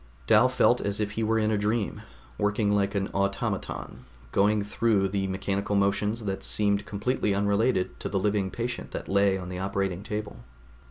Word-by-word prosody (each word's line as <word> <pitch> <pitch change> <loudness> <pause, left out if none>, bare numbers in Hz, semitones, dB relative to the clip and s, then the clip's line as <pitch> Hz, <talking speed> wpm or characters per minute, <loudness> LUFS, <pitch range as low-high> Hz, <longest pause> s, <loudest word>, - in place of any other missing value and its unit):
Dal 110 - +5
felt 125 -1 +3
as 100 0 -2
if 105 -1 -1
he 110 - -3
were 110 +1 +2
in 110 0 +1
a 105 - +1
dream, 105 +1 -1 0.4
working 105 0 +1
like 100 0 +1
an 95 -1 0
automaton, 100 0 -3 0.3
going 105 +1 +3
through 105 -2 +1
mechanical 100 +1 -1
motions 105 +3 +1
that 95 -1 -2
seemed 100 -1 +1
completely 105 0 0
unrelated 100 0 +1
to - - -4
the 100 - -1
living 100 -1 +1
patient 120 +5 -4
that - - -5
lay 100 0 +3
on 90 -1 -7
the 90 0 -5
operating 95 -1 -2
table. 105 +1 -5
100 Hz, 170 wpm, -27 LUFS, 100-105 Hz, 0.4 s, Dal